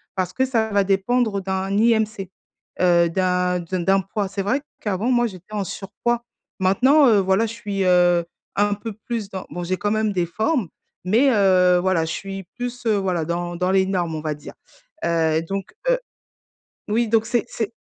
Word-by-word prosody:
parce 185 -1 -2
que 260 - +1
ça 225 -4 0
va 200 -1 +2
dépendre 200 +2 +1
d'un 190 0 -2
IMC. 220 -4 +1 0.5
Heu, 170 -2 +4
d'un 180 0 +1
d 175 +1 -3
d'un 195 +1 +4
poids. 195 +2 -3
C'est 195 +1 -4
vrai 255 +8 0 0.2
qu'avant, 210 +3 -1
moi, 240 -1 +3
j'étais 190 0 -12
en 205 -1 -1
surpoids. 235 +6 -3 0.4
Maintenant, 260 +10 +4
heu, 220 -3 +5
voilà 190 +3 +2
je 220 - -6
suis, 205 -4 -3
heu, 175 -1 +4 0.3
un 205 0 +2
peu 220 +2 -7
plus 220 -1 -5
dans 190 -2 -6
bon, 175 - -5
j'ai 185 +2 -1
quand 205 +2 -1
même 215 0 +1
des 180 -2 +1
formes, 220 - 0 0.4
mais 230 +9 +4
heu, 185 -4 +4
voilà 175 -3 +1
je 160 - -4
suis 195 0 -6
plus, 245 0 -5
heu, 220 -2 +3
voilà 180 -4 -1
dans 175 +1 -3
dans 180 +2 0
les 190 0 +3
normes, 175 -4 -1
on 155 - -4
va 155 -1 -2
dire. 150 - -11 0.5
Heu, 160 -1 +2
donc 195 +3 -5 0.2
heu - - +4 0.9
oui 230 +2 +1
donc 225 0 +3
c'est 240 0 0
c'est 225 0 -3
195 Hz, 190 wpm, -22 LUFS, 180-220 Hz, 0.9 s, heu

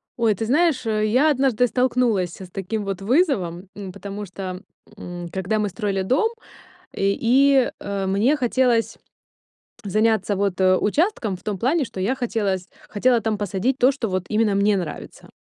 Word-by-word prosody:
Ой, 230 -3 +2
ты 225 - -4
знаешь, 285 +1 +2
э, 215 -1 0
я 255 +8 +3
однажды 260 -4 +2
столкнулась 235 -7 0
с 185 - -9
таким 195 +3 -3
вот 195 -1 -4
вызовом, 200 - +1
м, 195 -2 -7
потому 200 +2 -7
что, 185 0 -7 0.4
м, 175 -1 -7
когда 190 +4 -1
мы 210 -1 0
строили 195 -1 -2
дом, 265 - +2 0.6
и 195 0 0
и, 270 0 +4
э, 200 -1 -3
мне 210 +10 +2
хотелось 245 -3 +1 0.9
заняться 215 0 +1
вот, 195 -1 -1
э, 185 0 +5
участком 235 - 0
в - - -22
том 210 -2 -3
плане, 290 - +1
что 195 - -9
я 210 +8 0
хотела 225 -6 -1
с 180 0 -15 0.2
хотела 240 +3 +2
там 220 -1 -1
посадить 205 +6 -1
то, 255 +1 +5
что 260 -4 -3
вот 185 -1 -2
именно 215 -2 +2
мне 200 +1 +3
нравится. 175 -5 -7
215 Hz, 170 wpm, -22 LUFS, 195-250 Hz, 0.9 s, э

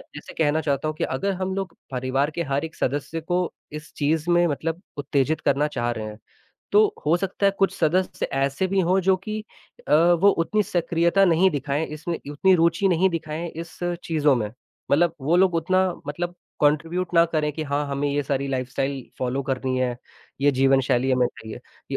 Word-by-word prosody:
जैसे 150 - -9
कहना 155 0 +1
चाहता 145 -1 -1
हूँ 155 - -3
कि - - -1
अगर 195 +10 -1
हम 190 0 -1
लोग 195 -1 -4 0.2
परिवार 130 +2 0
के 170 - -1
हर 140 +3 0
एक 160 - -10
सदस्य 145 +4 -2
को 175 +3 0 0.3
इस 150 +1 -8
चीज़ 155 +3 0
में 175 0 +4
मतलब 165 +3 -3 0.2
उत्तेजित 145 +2 0
करना 140 +2 +2
चाह 120 -5 -2
रहे 110 -2 -4
हैं, 105 0 -8 0.6
तो 420 0 +5
हो 155 +3 +3
सकता 195 +2 -1
है - - +5
कुछ 195 - +3
सदस्य 180 +3 0
ऐसे 135 +6 0
भी 190 +1 +1
हों 185 +2 +2
जो 190 -1 +5
कि 215 +3 -5 0.5
अ, - - +1
वो 170 +4 +5
उतनी 205 +5 +1
सक्रियता 170 0 +2
नहीं 180 +1 +4
दिखाएँ 145 +1 -1
इसमें, 160 +3 -5
उतनी 185 +6 +3
रुचि 170 +3 +3
नहीं 180 +1 +3
दिखाएँ 165 0 -4
इस 165 0 -9 0.3
चीज़ों 150 -3 +2
में, 110 -3 -2 0.4
मतलब 165 +3 +3
वो 155 +6 +2
लोग 185 -1 +4
उतना 185 +3 +2 0.2
मतलब 175 +4 -4 0.3
कॉन्ट्रिब्यूट 165 +5 +1
ना 170 0 +7
करें 155 -2 -1
कि 155 - -4
हाँ, 145 0 -1
हमें 140 +1 -1
ये 145 +1 0
सारी 140 0 -1
लाइफ़स्टाइल 135 +1 -2 0.2
फॉलो 130 +2 -1
करनी 130 -1 -2
है, 125 -1 0 0.4
ये 145 +1 +4
जीवन 135 0 +4
शैली 130 0 +1
है 130 - +3
मेरी 120 -3 -4
155 Hz, 190 wpm, -24 LUFS, 140-175 Hz, 0.6 s, ना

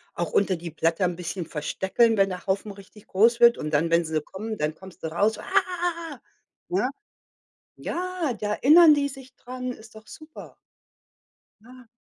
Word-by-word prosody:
auch 175 -1 -3
unter 195 -2 +2
die 170 0 -8
Blätter 165 +3 0
'n 175 -1 -1
bisschen 175 0 -5
verstecken, 190 +9 0
wenn 195 0 +4
der 180 -1 -7
Haufen 195 +2 -2
richtig 200 +1 -15
groß 230 +5 +3
wird, 235 0 +6
und 150 - -5
dann, 155 +3 +2
wenn 170 +1 +3
sie 160 -1 -2
kommen, 215 +7 -7
dann 150 -2 -2
kommst 190 +1 -15
du - - -1
raus: 205 +7 0
„Ah.” 335 -5 -2 0.5
Ja. 195 +8 0 0.9
Ja, 360 -6 -3
da 210 -1 -2
erinnern 315 +6 +7
die 285 -1 0
sich 265 -1 -12
dran, 255 0 -6
ist 220 -1 -15
doch 220 0 -14
super. 310 +7 -12 1.1
Ja. 250 +1 -16
210 Hz, 170 wpm, -25 LUFS, 175-255 Hz, 1.1 s, erinnern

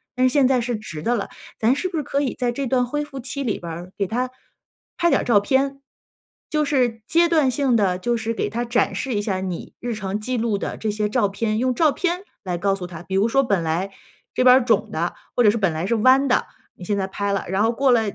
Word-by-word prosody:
但 255 0 +3
是 255 - -1
现 280 -3 +5
在 260 -1 +3
是 240 0 -2
直 180 -8 -8
的 240 +5 +1
了， 205 - -2 0.3
咱 230 +4 +3
是 370 +6 -2
不 350 - -4
是 300 - -1
可 280 +2 -1
以 270 -4 -1
在 245 -1 +1
这 275 +3 -3
段 250 0 +2
恢 295 +4 -2
复 280 -2 -8
期 275 +2 -4
里 225 - -1
边 170 -1 -6
儿， 175 +3 -8
给 200 - 0
他 250 +5 -2 0.7
拍 345 - +3
点 - - +3
儿 - - -4
照 225 -4 +5
片， 270 +6 0 0.7
就 305 -1 +1
是 250 -6 +1
阶 340 +1 +3
段 310 -6 +3
性 260 -1 +1
地 195 -5 +2
就 240 +3 0
是 225 0 -2
给 - - -2
他 240 +2 -2
展 240 +1 +1
示 265 -1 -2
一 205 - 0
下 195 -3 -2
你 185 -2 -5
日 240 -1 -3
常 195 -1 -3
记 250 +3 -2
录 225 -2 0
的 - - -4
这 220 - -2
些 210 0 -1
照 220 -1 +2
片。 215 +2 -1
用 255 +1 +1
照 310 +3 +4
片 360 +4 -1 0.2
来 180 -2 -2
告 195 +3 +1
诉 180 -2 -6
他。 170 -1 -9
比 190 +2 -4
如 200 +3 +3
说 275 +4 +3
本 200 -7 +1
来 170 +5 -1 0.4
这 255 - +1
边 250 0 +8
儿 255 - 0
肿 220 -2 +2
的， 170 +2 -1 0.2
或 245 - +4
者 210 - +6
是 230 - -2
本 195 -5 +1
来 160 +3 -2
是 220 - 0
弯 260 +5 +4
的， 250 - +2 0.3
你 - - -12
现 200 +3 -1
在 190 - 0
拍 200 +1 -2
了， 200 - -2
然 190 +2 +1
后 225 - +3
过 265 +3 +2
了 240 -2 +5
235 Hz, 290 characters per minute, -22 LUFS, 200-260 Hz, 0.7 s, 边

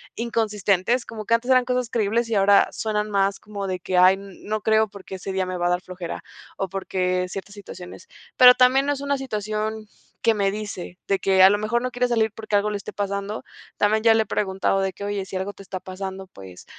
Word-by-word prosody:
inconsistentes, 220 0 0
como 215 -2 -8
que 230 - +1
antes 245 +3 -1
eran 255 -1 +5
cosas 250 -2 -1
creíbles 230 +1 0
y 220 - 0
ahora 200 0 +5
suenan 215 -1 -2
más 195 0 +1
como 200 -2 -6
de 185 -1 -3
que: 180 +1 -2
"Ay, 185 +1 +7
no 205 +2 -6
creo 220 0 +3
porque 195 -1 -10
ese 190 +1 -6
día 190 -1 0
me 185 0 -4
va 175 0 0
a - - +1
dar 180 0 0
flojera" 180 -2 -7 0.3
o 195 - -2
porque 185 -1 -1
ciertas 195 +1 -7
situaciones. 185 - -11 0.3
Pero 250 0 +9
también 255 +2 +4
no 290 - +2
es 275 - -6
una 280 0 0
situación 215 -2 -3 0.3
que 225 - +4
me 200 -2 +1
dice, 205 -4 -7
de 195 -1 +1
que 190 -1 +4
a 190 - +9
lo 205 - +2
mejor 215 +3 0
no 255 0 -3
quiere 250 0 0
salir 220 -2 +2
porque 215 -2 0
algo 210 +1 0
le 210 - -3
esté 200 - -8
pasando. 200 +1 -3 0.3
También 215 +1 +2
ya 225 -1 +6
le 220 0 +3
he - - -20
preguntado 195 -1 0
de 190 0 0
que: 200 - -7
"Oye, 205 -1 -3
si 190 - -5
algo 195 +2 -4
te 195 - -13
está 190 -1 -6
pasando, 190 0 -7
pues, 95 - -13
205 Hz, 230 wpm, -23 LUFS, 190-220 Hz, 0.3 s, Pero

